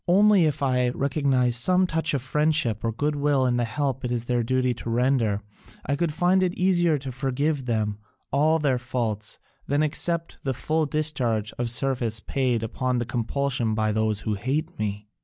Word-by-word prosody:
Only 200 Hz, 0 st, +5 dB
if 150 Hz, -2 st, -1 dB
I 125 Hz, -2 st, +2 dB
recognise 130 Hz, -2 st, +1 dB
some 185 Hz, +9 st, +4 dB
touch 160 Hz, -3 st, -1 dB
of 130 Hz, -, -2 dB
friendship 150 Hz, -5 st, 0 dB
or 115 Hz, -, 0 dB
goodwill 145 Hz, +1 st, +1 dB
in 125 Hz, -1 st, +1 dB
the 120 Hz, -, +1 dB
help 135 Hz, +2 st, -2 dB
it 125 Hz, -, -2 dB
is 120 Hz, -1 st, -2 dB
their 120 Hz, 0 st, 0 dB
duty 130 Hz, +1 st, +1 dB
to 120 Hz, -, -7 dB
render, 115 Hz, -4 st, +1 dB, 0.4 s
I 140 Hz, -, 0 dB
could 165 Hz, +2 st, 0 dB
find 180 Hz, +4 st, +2 dB
it 185 Hz, -1 st, 0 dB
easier 175 Hz, -4 st, +2 dB
to 135 Hz, -1 st, -6 dB
forgive 135 Hz, +2 st, -1 dB
them 105 Hz, -3 st, -1 dB, 0.3 s
all 155 Hz, +4 st, +3 dB
their 140 Hz, -5 st, +1 dB
faults 115 Hz, -3 st, -3 dB, 0.3 s
than 145 Hz, +2 st, +1 dB
to -, -, +3 dB
accept 165 Hz, +2 st, -1 dB
the 135 Hz, -2 st, -1 dB
full 155 Hz, +4 st, 0 dB
discharge 125 Hz, -8 st, 0 dB
of 120 Hz, -1 st, 0 dB
service 120 Hz, -3 st, 0 dB
paid 125 Hz, 0 st, -1 dB
upon 125 Hz, +2 st, -1 dB
compulsion 120 Hz, 0 st, -1 dB
by 110 Hz, 0 st, +1 dB
those 110 Hz, 0 st, 0 dB
who 110 Hz, -, -2 dB
hate 150 Hz, -, -3 dB
me." 105 Hz, 0 st, -3 dB
130 Hz, 180 wpm, -25 LUFS, 115-150 Hz, 0.4 s, Only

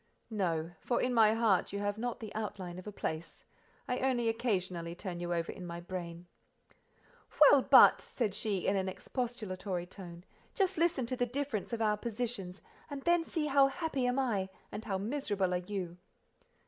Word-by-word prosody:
"No; 170 Hz, -6 st, -1 dB
for 245 Hz, -, 0 dB
in 250 Hz, -, +1 dB
my 220 Hz, -2 st, +5 dB
heart 220 Hz, -5 st, +2 dB
you 200 Hz, -, -3 dB
have 205 Hz, +1 st, -2 dB
not 245 Hz, 0 st, -3 dB
the 220 Hz, -2 st, -7 dB
outline 195 Hz, -5 st, -5 dB
of 185 Hz, -, -11 dB
a -, -, -4 dB
place: 160 Hz, -4 st, -5 dB, 0.4 s
I 250 Hz, 0 st, -1 dB
only 245 Hz, -3 st, +1 dB
occasionally 185 Hz, -7 st, -1 dB
turn 180 Hz, -2 st, -5 dB
you 175 Hz, 0 st, -3 dB
over 170 Hz, -1 st, -1 dB
in 185 Hz, -, -9 dB
my 170 Hz, -1 st, -5 dB
brain." 175 Hz, -1 st, -6 dB, 1.1 s
"Well, -, -, +8 dB
but," -, -, +8 dB
said 220 Hz, -6 st, -2 dB
she, 205 Hz, -3 st, -1 dB
in 195 Hz, -, +2 dB
an 190 Hz, -1 st, 0 dB
expostulatory 195 Hz, -6 st, -4 dB
tone, 175 Hz, -2 st, -10 dB, 0.3 s
"just 385 Hz, -1 st, +2 dB
listen 330 Hz, -7 st, +2 dB
to 255 Hz, +2 st, -2 dB
the 245 Hz, 0 st, 0 dB
difference 255 Hz, -4 st, -3 dB
of 230 Hz, -1 st, -1 dB
our 210 Hz, -1 st, +2 dB
positions, 220 Hz, -5 st, -4 dB, 0.3 s
and 280 Hz, -2 st, -6 dB
then 345 Hz, -1 st, +3 dB
see 320 Hz, -2 st, -2 dB
how 275 Hz, -1 st, +5 dB
happy 275 Hz, -3 st, -1 dB
am 250 Hz, +1 st, +1 dB
I, 210 Hz, -8 st, 0 dB, 0.2 s
and 215 Hz, -, -5 dB
how 195 Hz, -4 st, -1 dB
miserable 205 Hz, -4 st, -1 dB
are -, -, +2 dB
you." 180 Hz, -1 st, -5 dB
210 Hz, 180 wpm, -32 LUFS, 180-245 Hz, 1.1 s, Well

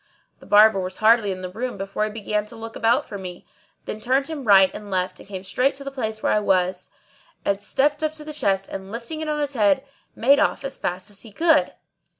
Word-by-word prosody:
The -, -, -16 dB
Barber 210 Hz, -1 st, +6 dB
was 185 Hz, 0 st, -4 dB
hardly 220 Hz, -2 st, +4 dB
in 185 Hz, -1 st, -5 dB
the 185 Hz, -1 st, -6 dB
room 245 Hz, +3 st, -4 dB
before 195 Hz, +2 st, -2 dB
he -, -, -3 dB
began 210 Hz, -1 st, -2 dB
to 230 Hz, -, -9 dB
look 225 Hz, 0 st, -8 dB
about 235 Hz, +5 st, +2 dB
for 200 Hz, -, -7 dB
me, 180 Hz, -2 st, -8 dB, 0.4 s
then 215 Hz, -, -5 dB
turned 260 Hz, +5 st, +1 dB
him 295 Hz, -5 st, -5 dB
right 195 Hz, -3 st, +6 dB
and 210 Hz, -1 st, -8 dB
left 185 Hz, -1 st, -1 dB
and -, -, -15 dB
came 190 Hz, -2 st, -6 dB
straight 255 Hz, +8 st, +1 dB
to 275 Hz, -, -9 dB
the 275 Hz, -, -5 dB
place 220 Hz, -5 st, -4 dB
where -, -, +2 dB
I 215 Hz, -, +3 dB
was, 185 Hz, -2 st, 0 dB, 0.6 s
and 200 Hz, 0 st, 0 dB
stepped 290 Hz, +8 st, +1 dB
up 310 Hz, 0 st, 0 dB
to 310 Hz, -1 st, -7 dB
the 305 Hz, 0 st, -7 dB
chest 195 Hz, -8 st, 0 dB
and, 190 Hz, 0 st, -7 dB
lifting 240 Hz, +8 st, -5 dB
it 310 Hz, -, -3 dB
on 300 Hz, 0 st, -1 dB
his 290 Hz, -1 st, -2 dB
head, 255 Hz, +4 st, +2 dB, 0.3 s
made 280 Hz, +5 st, +4 dB
off 280 Hz, -, +1 dB
as 275 Hz, 0 st, -5 dB
fast 180 Hz, +3 st, -3 dB
as 200 Hz, -, -6 dB
he 225 Hz, -, -12 dB
could. 320 Hz, +6 st, +3 dB
215 Hz, 240 wpm, -23 LUFS, 195-275 Hz, 0.6 s, Barber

